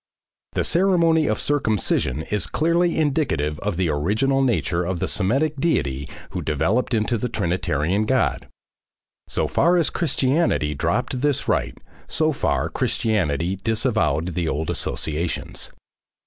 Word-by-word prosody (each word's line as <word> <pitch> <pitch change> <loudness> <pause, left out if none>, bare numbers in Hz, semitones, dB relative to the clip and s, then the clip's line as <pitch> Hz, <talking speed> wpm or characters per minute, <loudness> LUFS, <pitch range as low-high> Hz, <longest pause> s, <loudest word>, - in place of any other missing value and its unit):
The - - 0
ceremony 170 -4 +3
of 110 - 0
circumcision 110 - 0
is 105 -1 0
clearly 170 +2 +1
indicative 135 - 0
of 100 -4 -2
the 90 -3 +1
original 110 - +1
nature 110 -9 +1
of 90 +1 -2
the - - -1
Semitic 135 +10 0
deity 70 - 0 0.2
who - - -3
developed 105 - 0
into 110 +1 0
the 125 - -2
Trinitarian 90 -1 0
God. 130 -3 +1 0.8
So - - -1
far 175 +1 +3
as 170 - +2
Christianity 135 - +1
dropped 120 - -1
this 145 -2 0
rite, - - 0 0.3
so 155 +1 +1
far 140 - 0
Christianity 90 -4 0
disavowed 110 - 0
the 85 -2 -2
old 75 +2 -2
associations. 80 +2 -3
110 Hz, 130 wpm, -22 LUFS, -, 0.8 s, ceremony